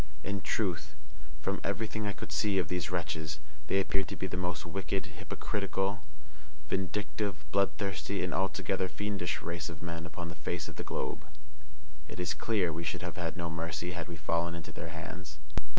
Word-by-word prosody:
In 100 0 0
truth, 80 -9 +1 0.5
from 95 +5 +1
everything 105 +1 +1
I - - +3
could - - -5
see 105 -3 +4
of 90 -3 +3
these 90 -2 +1
wretches, 80 -3 0 0.3
they 95 - +5
appeared 95 0 +3
to - - -3
be - - -1
the 90 - -1
most 90 +1 0
wicked, 95 +2 0
hypocritical, 100 +1 0 0.7
vindictive, 95 -3 0
bloodthirsty, 100 0 +2
and 90 - +1
altogether 95 0 +2
fiendish 100 -5 0
race 85 0 -1
of 85 0 -6
men 85 -1 -2
upon 85 +1 -4
the - - -3
face 85 -1 -1
of - - -8
the - - -1
globe. 75 - -1 0.8
It - - -6
is 90 - +2
clear 100 -7 +3
we 85 +2 -1
should 90 +1 0
have 90 -2 -2
had 85 -1 -1
no 85 -1 0
mercy 80 +1 -1
had 85 -2 -2
we 85 - -4
fallen 85 +2 +2
into 85 -2 -5
their - - -4
hands. 85 -4 -5
90 Hz, 180 wpm, -34 LUFS, 85-95 Hz, 0.8 s, they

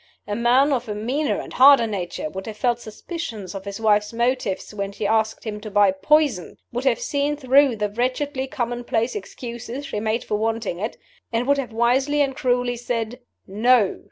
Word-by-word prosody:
A 205 - -3
man 250 +5 +4
of 245 -3 -2
a 210 - -2
meaner 260 +8 -1
and - - -8
harder 270 -2 +7
nature 190 -7 -4
would 190 +6 -7
have 215 -1 -6
felt 240 0 +1
suspicions 220 - -7
of 195 0 -7
his 200 +1 -6
wife's 210 -1 +2
motives 235 -4 -1
when 200 -1 -3
she 205 +1 -5
asked 220 +1 +1
him 210 -2 -5
to 215 - -7
buy 205 -1 +4
poison 225 - +1 0.2
would 245 +3 -3
have 255 -3 +3
seen 290 +1 -1
through 270 -1 +4
the 210 -1 -1
wretchedly 260 +4 -1
commonplace 240 -2 -2
excuses 245 - -6
she 210 - -3
made 220 +2 -1
for 210 - -1
wanting 225 -5 -2
it 215 +4 -4 0.3
and 230 +1 0
would 280 +1 +3
have 250 -4 -4
wisely 255 +6 +2
and 270 -2 0
cruelly 245 -1 0
said, 235 0 -3 0.3
'No. 215 +1 +3
235 Hz, 185 wpm, -23 LUFS, 210-260 Hz, 0.3 s, harder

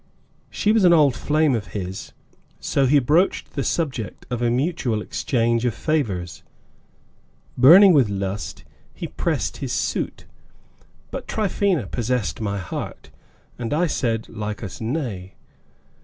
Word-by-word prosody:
She 210 - +1
was 220 -2 +3
an 175 -1 +7
old 145 -6 +4
flame 150 +1 +2
of 110 -4 -4
his, 95 0 -6 0.5
so 135 -1 +1
he 145 +3 +5
broached 150 +8 +2
the - - -2
subject 135 -10 -3
of 120 -1 -2
a 120 - +2
mutual 130 -3 0
exchange 115 +1 0
of 120 -3 0
favors. 105 - -2 1.1
Burning 175 +10 +8
with 135 -8 +4
lust, 100 0 -4 0.3
he - - -5
pressed - - -2
his - - -4
suit, - - -2 0.9
but - - -6
Tryphaena 200 - 0
possessed 120 +1 -2
my 100 -2 -2
heart, 90 -6 -6 0.5
and 120 +4 -2
I 175 +3 +2
said 115 -8 -1
Lycas 105 -1 -6
nay. 110 - -4
125 Hz, 130 wpm, -22 LUFS, 105-155 Hz, 1.1 s, Burning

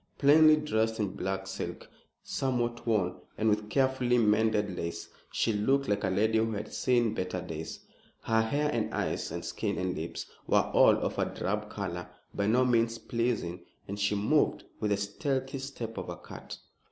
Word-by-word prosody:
Plainly 155 +2 +7
dressed 110 -7 0
in 105 -2 +1
black 95 +1 -2
silk, 95 0 -5 0.4
somewhat 120 -3 -1
worn, 100 -6 +1 0.2
and 110 0 +2
with 105 0 0
carefully 130 -1 +2
mended 105 -3 +2
lace, 85 -1 -4 0.2
she 115 - +1
looked 135 +7 +2
like 100 0 0
a 95 - +1
lady 110 +4 +2
who 115 0 0
had 105 +1 -5
seen 120 -4 +2
better 90 -3 -2
days. 80 -3 -6 0.4
Her 115 0 +2
hair, 145 +6 0
and 115 -2 -1
eyes, - - -2
and - - -5
skin, - - -2
and 95 -1 -1
lips, 80 +2 -5 0.2
were - - +5
all - - +6
of - - -2
a - - +3
drab 105 +2 -3
color, 90 -4 -5 0.2
by 100 0 0
no 125 +4 +4
means 115 -2 +2
pleasing, 115 -8 -2 0.2
and 100 +1 -5
she 100 +1 +2
moved 110 +10 +2 0.2
with 105 - 0
the 100 - +2
stealthy 135 +7 -2
step 125 -4 -5
of - - -6
a - - -5
cat. - - -9
110 Hz, 175 wpm, -30 LUFS, 100-125 Hz, 0.4 s, Plainly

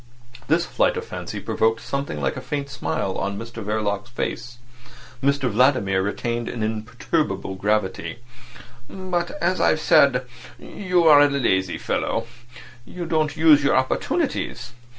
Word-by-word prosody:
This - - +2
flight - - +1
of - - -4
fancy - - -6
provoked 115 +1 0
something 140 - -3
like 70 -2 -1
a - - -6
faint 140 -1 -4
smile 100 -7 -2
on 100 0 -2
Mr 115 +1 -7
Verloc's 105 +1 -2
face. 120 +1 -4 0.6
Mr 140 -1 +1
Vladimir 110 -5 +2
retained 115 +4 -2
an 115 -3 -4
imperturbable 110 - -2
gravity. 100 +2 -1 0.7
"But, 180 -2 -3
as 185 +2 0
I've 155 - +3
said, 140 -5 +4 0.3
you 180 -3 -1
are 150 -3 +8
a 145 - +5
lazy 95 -10 0
fellow; - - -2 0.6
you 175 +7 -7
don't 155 -2 0
use 155 -3 +6
your 140 - +3
opportunities. 130 - -1
125 Hz, 135 wpm, -23 LUFS, 105-150 Hz, 0.7 s, are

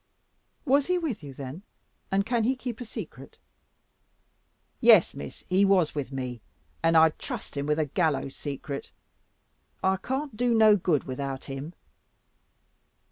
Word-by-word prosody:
"Was 280 0 +3
he 360 0 +2
with 305 - -3
you 145 -2 -8
then? 135 +5 -8 0.5
And 195 +1 +2
can 235 0 +1
he 255 +4 +2
keep 250 -2 -6
a - - -4
secret?" 160 - -9 1.4
"Yes, - - +6
Miss, 70 - -9
he 190 +2 +3
was 190 -5 +3
with 140 -3 -4
me, 125 -3 -5 0.4
and 165 0 +4
I'd 160 -1 +5
trust - - -6
him 140 0 -2
with 150 0 +1
a 155 - +1
gallows 140 -3 0
secret. 140 -1 -5 0.9
I 190 0 +3
can't 265 +5 -3
do 240 +1 +2
no 215 -1 +7
good 170 -6 +1
without 135 0 -4
him." 140 +5 -7
165 Hz, 145 wpm, -27 LUFS, 140-220 Hz, 1.4 s, no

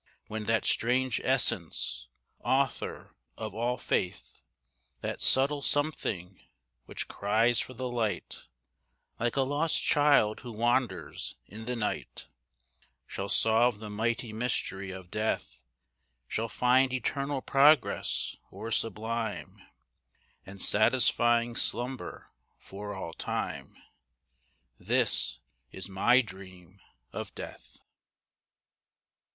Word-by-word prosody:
When 110 0 -5
that 115 +1 +1
strange 125 +1 +2
essence, 95 - 0 0.3
author - - -1 0.2
of 110 -1 -5
all 120 +3 -1
faith, 90 -4 -2 0.6
That - - -4
subtle 140 +2 +4
something, 100 - -1 0.4
which - - -4
cries 115 +4 +2
for 130 - -4
the 130 +2 -3
light, 115 -4 -2 0.7
Like 120 0 0
a 140 - +3
lost 145 +4 +1
child 145 -8 +4
who 120 -2 -8
wanders 120 +3 -1
in 110 - -10
the 125 +1 -2
night, 110 -3 -4 0.8
Shall 100 +1 -5
solve 115 +2 +4
the 105 0 -8
mighty 115 +1 -1
mystery 105 -4 -1
of 95 -1 -9
Death, 105 -11 -2 0.7
Shall 115 - -2
find 130 +2 +3
eternal 140 +2 -2
progress, 140 -1 +3
or 115 +1 -7
sublime 115 +1 -2 0.9
And 100 +1 -10
satisfying 120 +2 +3
slumber 125 +3 -1 0.3
for 105 +1 -8
all 85 -4 -6
time. - - -4 1.0
This - - +1 0.3
is 95 - -5
my 115 +7 +4
dream 95 -3 -12 0.3
of - - -6
Death. - - -9
115 Hz, 100 wpm, -30 LUFS, 105-125 Hz, 1.0 s, subtle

